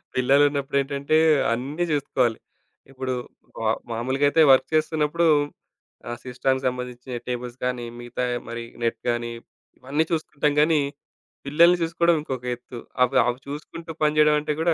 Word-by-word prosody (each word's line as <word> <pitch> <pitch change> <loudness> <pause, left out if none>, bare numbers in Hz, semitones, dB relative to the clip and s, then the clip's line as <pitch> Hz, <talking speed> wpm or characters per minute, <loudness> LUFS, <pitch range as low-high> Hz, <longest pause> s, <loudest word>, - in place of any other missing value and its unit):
పిల్లలున్నప్పుడు 140 +2 +2
ఏంటంటే 140 +2 0 0.4
అన్నీ 140 +8 -3
జూసుకోవాలి. 130 -5 +1 0.5
ఇప్పుడు 130 -1 -3 0.5
మా 110 -1 0 0.2
మామూలుగా 130 +5 0
అయితే 160 - +3
వర్క్ 130 - +5
చేస్తున్నప్పుడు, 155 +1 +1 0.8
ఆ - - -2
సిస్టమ్‌కి 130 +1 -1
సంబంధించిన 125 0 -5
టేబుల్స్ 125 0 -4
గానీ, 125 -1 -2
మిగతా 120 +1 -3 0.2
మరి 115 0 -5 0.2
నెట్ 115 - 0
గానీ, 120 0 -1 0.5
ఇవన్నీ 145 +5 0
చూసుకుంటాం 150 -2 0
గానీ, 155 -1 +3 0.7
పిల్లల్ని 170 +5 +5
చూసుకోడం 170 +1 +2
ఇంకొక 130 -4 -5
ఎత్తు. 120 0 -11 0.2
అవ్ 125 - 0
అవి 120 +1 -1
చూసుకుంటూ 160 +3 -7
పనిజేయడమంటే 150 0 +3
గూడా 170 0 +3
135 Hz, 125 wpm, -24 LUFS, 125-150 Hz, 0.8 s, వర్క్